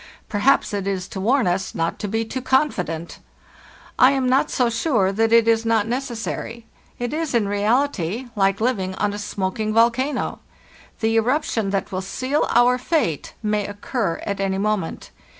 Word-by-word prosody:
Perhaps 215 Hz, +2 st, +2 dB
it 200 Hz, -1 st, -2 dB
is 190 Hz, -2 st, -2 dB
to 190 Hz, -, -5 dB
warn 250 Hz, +6 st, +2 dB
us 180 Hz, +2 st, -1 dB
not 165 Hz, 0 st, -1 dB
to 210 Hz, -, -3 dB
be 225 Hz, +3 st, -1 dB
too 260 Hz, +3 st, -4 dB
confident! 180 Hz, -, -1 dB, 0.8 s
I 255 Hz, +2 st, +7 dB
am 265 Hz, -2 st, 0 dB
not 265 Hz, +4 st, +3 dB
so 250 Hz, -2 st, +1 dB
sure 230 Hz, -, +1 dB
that 225 Hz, +3 st, +1 dB
it 230 Hz, 0 st, +5 dB
is 225 Hz, 0 st, +3 dB
not 225 Hz, -2 st, +2 dB
necessary. 235 Hz, -2 st, -4 dB, 0.3 s
It 245 Hz, +2 st, -3 dB
is 315 Hz, -4 st, -2 dB
in 220 Hz, -4 st, +2 dB
reality 215 Hz, -, 0 dB
like 195 Hz, -1 st, +2 dB
living 200 Hz, -6 st, -1 dB
on 205 Hz, +1 st, -1 dB
a 205 Hz, -, -5 dB
smoking 210 Hz, +1 st, -2 dB
volcano. 240 Hz, +5 st, +1 dB, 0.6 s
The 225 Hz, 0 st, +2 dB
eruption 230 Hz, -3 st, +1 dB
that 195 Hz, 0 st, -2 dB
will 185 Hz, 0 st, -2 dB
seal 260 Hz, +9 st, -1 dB
our 245 Hz, +1 st, +4 dB
fate 250 Hz, -, -1 dB
may 210 Hz, -1 st, 0 dB
occur 205 Hz, -2 st, -3 dB
at 200 Hz, -1 st, -3 dB
any 195 Hz, -1 st, 0 dB
moment. 205 Hz, -4 st, -2 dB
225 Hz, 170 wpm, -22 LUFS, 195-250 Hz, 0.8 s, I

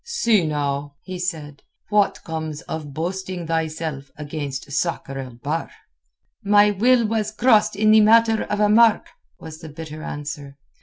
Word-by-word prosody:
"See 235 Hz, -, +1 dB
now," 145 Hz, -1 st, -2 dB
he 185 Hz, -1 st, -7 dB
said, 155 Hz, -6 st, -5 dB, 0.3 s
"what 205 Hz, -1 st, +1 dB
comes 160 Hz, -2 st, -5 dB
of 155 Hz, -2 st, -6 dB
boasting 180 Hz, +3 st, -4 dB
thyself 160 Hz, -3 st, -3 dB
against 145 Hz, -3 st, -6 dB
Sakr 140 Hz, -3 st, -2 dB
el 130 Hz, -3 st, -8 dB
Bahr." 145 Hz, +7 st, -3 dB, 0.7 s
"My 205 Hz, +1 st, +5 dB
will 235 Hz, +4 st, +3 dB
was 215 Hz, -1 st, -1 dB
crossed 215 Hz, -1 st, +3 dB
in 215 Hz, +1 st, +3 dB
the 215 Hz, 0 st, +7 dB
matter 225 Hz, +1 st, +4 dB
of 210 Hz, -, -3 dB
a 210 Hz, -, +4 dB
mark," 225 Hz, +1 st, +5 dB, 0.3 s
was 160 Hz, -1 st, -10 dB
the 160 Hz, -, -10 dB
bitter 155 Hz, 0 st, -9 dB
answer. 145 Hz, -2 st, -7 dB
165 Hz, 150 wpm, -22 LUFS, 150-210 Hz, 0.7 s, the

